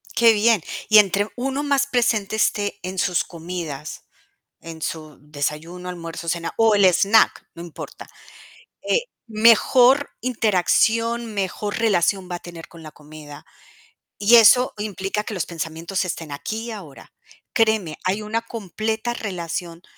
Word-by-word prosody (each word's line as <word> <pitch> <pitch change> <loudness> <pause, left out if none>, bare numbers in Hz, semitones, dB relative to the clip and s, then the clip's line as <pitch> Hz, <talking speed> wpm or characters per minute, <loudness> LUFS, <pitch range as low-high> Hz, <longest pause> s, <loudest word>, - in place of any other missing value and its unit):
Qué 230 -1 +6
bien. 220 -1 +3 0.3
Y 215 0 +8
entre 200 +1 +2
uno 270 +3 -2
más 280 -1 +1
presente 225 -5 0
esté 205 -1 0
en 185 0 -5
sus 180 0 +1
comidas, 165 -4 -7 0.5
en 165 -1 -10
su 155 -3 -6
desayuno, 150 +5 -5
almuerzo, 170 -1 -7
cena, 170 0 -2
o 225 -1 +4
el 200 -2 +4
snack, 200 +4 +3
no 170 - -10
importa, 170 -2 -10 0.8
eh, 485 - +3 0.3
mejor 240 +5 +4
interacción, 230 +1 +1
mejor 205 +1 -3
relación 190 -3 +1
va 175 - -3
a - - -6
tener 170 -2 -11
con 165 -1 -14
la 155 - -10
comida. 150 -1 -13 0.7
Y 210 +4 +6
eso 245 +3 +6
implica 205 0 -3
que 215 - -6
los 185 -6 -2
pensamientos 165 +3 -4
estén 165 -4 -5
aquí 220 +10 -5
y - - -5
ahora. 180 -11 -11 0.4
Créeme, 220 -9 +1
hay 195 +3 -1
una 225 +2 -2
completa 220 +1 -4
relación 175 -4 -5
195 Hz, 140 wpm, -22 LUFS, 170-225 Hz, 0.8 s, Y